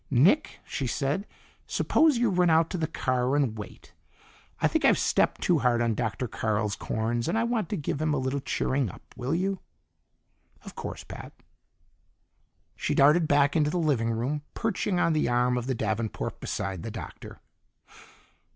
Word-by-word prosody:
"Nick," 165 - +3
she 135 - -3
said, 145 - -1 0.4
"suppose 310 -5 +3
you 235 -3 +2
run 180 -1 +3
out 160 0 +3
to 185 - -2
the 160 - 0
car 130 0 0
and 135 -7 +1
wait. 105 -3 -10 0.7
I - - +3
think - - 0
I've - - +5
stepped - - +1
too - - +3
hard 120 -1 +2
on 115 -1 +1
Dr. 115 +2 -2
Carl's 105 -1 -1
corns, 115 +4 -2
and 175 - 0
I 225 - +2
want 235 -2 -1
to 210 - -2
give 145 -1 -3
him 155 0 +1
a 150 - +1
little 130 +2 -1
cheering 130 -2 -1
up. - - -12
Will 130 +6 -2
you?" 190 +2 -1 1.1
"Of - - -9
course, - - -6
Pat." - - -9 1.4
She - - -1
darted 150 +4 +5
back 145 -1 +3
into 150 -2 +3
the 180 - -1
living 140 -9 +1
room, 125 +6 -1
perching 210 -4 -1
on 165 - +3
the 155 -5 +1
arm 125 +1 +2
of 125 0 -3
the 130 - 0
davenport 110 0 -2
beside 95 -4 -3
the 115 - -5
Doctor. - - -9
140 Hz, 175 wpm, -27 LUFS, 120-165 Hz, 1.4 s, I've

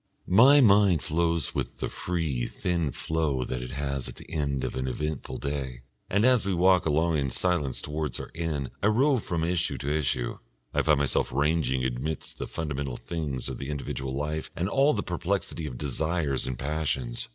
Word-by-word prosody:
My 130 +10 +7
mind 100 - +5
flows 85 -1 0
with - - -3
the - - -2
free, 80 -9 -2
thin 85 -4 -1
flow 75 -2 -1
that 60 0 -3
it 60 - -6
has 70 0 -3
at - - -9
the - - -12
end 70 -4 -1
of - - -2
an 65 0 -2
eventful 75 +3 -3
day, 65 -4 -4 0.3
and 105 +4 +3
as 125 -3 +5
we 100 -2 0
walk 90 0 +4
along 80 +1 +2
in 70 -1 0
silence 75 -2 0
towards 75 -4 -2
our - - -7
inn 80 -6 -2
I 100 - +3
rove 130 +3 +3
from 85 -2 -1
issue 85 0 0
to 75 +2 -1
issue, 65 -5 -1 0.3
I - - +3
find 75 -2 +4
myself 70 -1 +1
ranging 70 -2 +1
amidst 65 +5 -3
the - - -3
fundamental 70 -5 -3
things 75 -7 -4
of - - -5
the 70 - -5
individual 65 -2 -3
life 75 +2 -2
and 90 - -1
all 140 +7 +4
the 105 - -1
perplexity 90 -2 -2
of 60 - -6
desires 75 +1 -1
and 65 -2 -3
passions. 65 -4 -2
75 Hz, 185 wpm, -28 LUFS, 70-85 Hz, 0.3 s, My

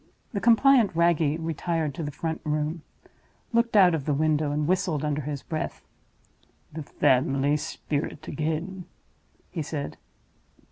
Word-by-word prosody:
The 200 - -2
compliant 235 -3 +5
Wragge 165 -3 +3
retired 165 -1 -2
to 165 - -6
the 145 - -3
front 160 +2 -4
room; 155 +1 -1 0.7
looked 235 -1 +2
out 185 -3 +7
of 150 -4 -2
the 150 - +1
window; 155 0 +1
and 150 0 0
whistled 180 -5 0
under 150 0 -1
his 145 -1 -5
breath. 155 -1 -4 0.9
"The 160 - -5
family 135 +1 +2
spirit 150 0 -4
again!" 160 +5 -3 0.7
he 170 - -3
said. 145 -1 -4
155 Hz, 135 wpm, -26 LUFS, 150-170 Hz, 0.9 s, out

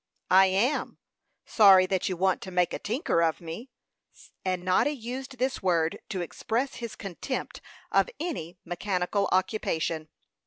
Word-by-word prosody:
"I 190 +1 +7
am 210 +10 0 0.5
sorry 195 -4 +7
that 190 +2 0
you 185 - -3
want 190 +1 +1
to 190 - -7
make 180 -1 +1
a - - -3
tinker 220 - 0
of 165 -1 +1
me;" 170 +10 -8 0.7
and 185 -1 -1
Noddy 185 +9 +3
used 260 +1 -6
this 260 +1 -1
word 170 -4 +1
to 190 -3 -2
express 230 - -2
his 235 -2 -6
contempt 200 +7 -5 0.3
of - - +3
any 260 - -4
mechanical 185 +2 -1
occupation. 165 -5 0
190 Hz, 145 wpm, -28 LUFS, 175-235 Hz, 0.7 s, I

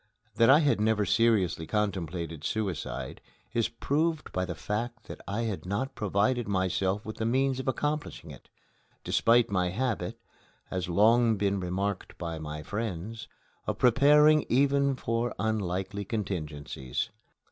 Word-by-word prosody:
That 115 - +5
I 145 +4 +7
had 145 -8 +2
never 110 -1 +2
seriously 100 -9 +2
contemplated 85 -6 -2
suicide 95 -7 -3 0.3
is 115 -1 +1
proved 155 +6 -1
by 90 0 -1
the 90 -2 -5
fact 110 +6 -4
that - - -9
I 100 +4 -2
had 110 -5 -3
not 100 +9 -2
provided 105 +4 0
myself 95 +1 0
with 110 - -6
the 110 - -2
means 130 +2 +1
of 130 - -5
accomplishing 145 +3 -2
it, - - -14 0.5
despite 115 -1 +3
my 90 -2 +1
habit, 110 -3 -2 0.5
has 90 -1 -2
long 110 +4 +4
been 100 0 0
remarked 95 +2 -3
by 85 -2 -4
my 75 0 -6
friends, 110 +3 -4 0.4
of - - -1
preparing 150 +5 +5
even 140 +2 +3
for 115 -1 -2
unlikely 100 -1 -2
contingencies. 75 - -4
105 Hz, 135 wpm, -29 LUFS, 95-120 Hz, 0.5 s, I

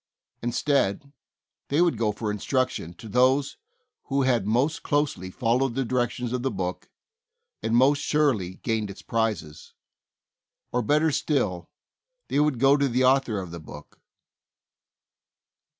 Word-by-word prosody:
Instead, 140 +1 0 0.5
they 145 - 0
would 175 -6 +3
go 110 -1 0
for 105 0 -3
instruc 130 +5 0
tion 80 - -6
to 110 - -11
those 130 +5 +2 0.5
who 140 0 0
had 120 -6 +1
most 130 +9 +1
closely 145 -11 -1
followed 120 +4 0
the 135 - 0
directions 125 0 -1
of 125 - -1
the 135 - 0
book, 90 -6 -4 0.7
and 115 - 0
most 140 +4 +4
surely 125 -12 +1
gained 110 -2 -2
its 100 - -10
prizes. 105 -10 -3 1.0
Or, 125 - +1
better 150 +6 +2
still, 105 - -1 0.6
they - - +1
would 150 -3 +2
go 135 +3 +5
to 140 -1 +2
the 125 0 +1
author 130 -4 +3
of 90 -3 -7
the 85 - -7
book. 80 - -13
125 Hz, 140 wpm, -25 LUFS, 105-140 Hz, 1.0 s, go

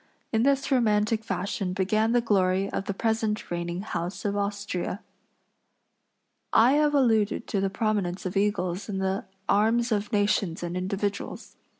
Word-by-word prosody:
In 220 - +3
this 275 +2 +2
romantic 220 -3 +2
fashion 195 -3 -2
began 215 +4 +1
the 240 0 +3
glory 195 -3 +2
of 195 - -3
the 200 - -2
present 220 -2 -1
reigning 175 +1 -3
house 180 -2 -4
of 200 0 0
Austria. 200 -1 -3 1.5
I 230 +3 +6
have 295 +1 +3
alluded 225 -5 +2
to 200 - -1
the 195 - +1
prominence 195 -4 -1
of 185 - -3
eagles 195 -1 0
in 195 - -2
the 190 0 -1 0.2
arms 230 +4 +2
of 210 +1 0
nations 205 -5 +1
and 175 0 -3
individuals. 195 +2 -3
205 Hz, 150 wpm, -27 LUFS, 190-220 Hz, 1.5 s, I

